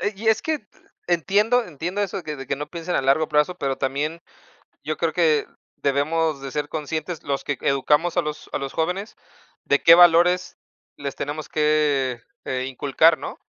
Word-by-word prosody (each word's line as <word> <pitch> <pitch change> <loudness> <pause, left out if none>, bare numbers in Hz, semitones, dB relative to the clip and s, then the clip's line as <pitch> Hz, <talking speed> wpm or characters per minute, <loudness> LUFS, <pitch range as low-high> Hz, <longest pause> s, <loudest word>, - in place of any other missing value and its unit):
Eh, 205 - -1
y 220 +2 -2
es 220 -1 +3
que 315 - 0
e 210 -7 -5
entiendo 210 +8 +2
entiendo 175 +4 -4
eso, 195 -2 -3
que 150 -1 -5
de 135 - -8
que 135 - -2
no 150 +1 -6
piensen 170 +1 -5
a - - +1
largo 140 +4 +2
plazo, 150 +4 +1
pero 135 -1 -1
también 145 +5 -2 0.6
yo - - -2
creo - - -1
que 455 -2 +2 0.3
debemos 145 +2 0
de 135 - -6
ser 150 +2 -3
conscientes, 155 +2 -4
los 140 -1 -3
que 145 -4 -3
educamos 150 +5 +1
a 175 - +3
los 150 0 -6
a - - -1
los 140 -1 -5
jóvenes, 180 +6 -2 0.5
de - - +2
qué 165 - +9
valores 175 +1 +5 0.4
les 140 -1 -5
tenemos 150 +2 -5
que, 150 -5 +1 0.2
eh, 130 0 -2
inculcar, 145 +5 +3
¿no? - - -7
155 Hz, 185 wpm, -23 LUFS, 140-180 Hz, 0.6 s, qué